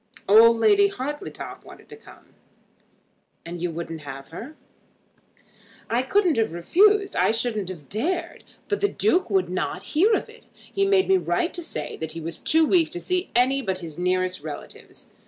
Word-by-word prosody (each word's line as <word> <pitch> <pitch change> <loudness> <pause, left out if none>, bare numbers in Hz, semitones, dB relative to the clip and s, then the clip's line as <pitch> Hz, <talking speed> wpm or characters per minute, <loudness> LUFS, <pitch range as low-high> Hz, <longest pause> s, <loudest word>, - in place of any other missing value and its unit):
Old 230 +3 +7
Lady 405 - +5
Hartletop 295 -1 -6
wanted - - -15
to 440 - -10
come." 440 - -18 1.1
"And 170 0 -7
you 175 - -1
wouldn't 165 -1 -6
have 135 -1 -9
her?" 235 - -9 1.4
"I 235 +2 +2
couldn't 350 - +2
have 225 -5 +1
refused. 400 - +3
I - - +3
shouldn't 225 -4 -2
have 160 -7 -9
dared. 340 - -3 0.2
But 410 - -2
the 405 - +4
Duke 380 - +1
would 190 -3 +2
not 185 0 -3
hear 385 +9 +4
of - - -3
it. - - -17
He 395 0 -2
made 390 -1 +3
me 385 0 +4
write 360 -1 -1
to 350 - -4
say 155 - -6
that 160 -1 -6
he 165 - -6
was 165 +1 -6
too 320 0 +3
weak 330 0 +3
to 350 - -3
see 365 +1 -1
any 260 +3 +3
but 190 -6 -2
his 170 -3 -9
nearest 185 0 0
relatives. 150 -1 -9
240 Hz, 175 wpm, -24 LUFS, -, 1.4 s, Old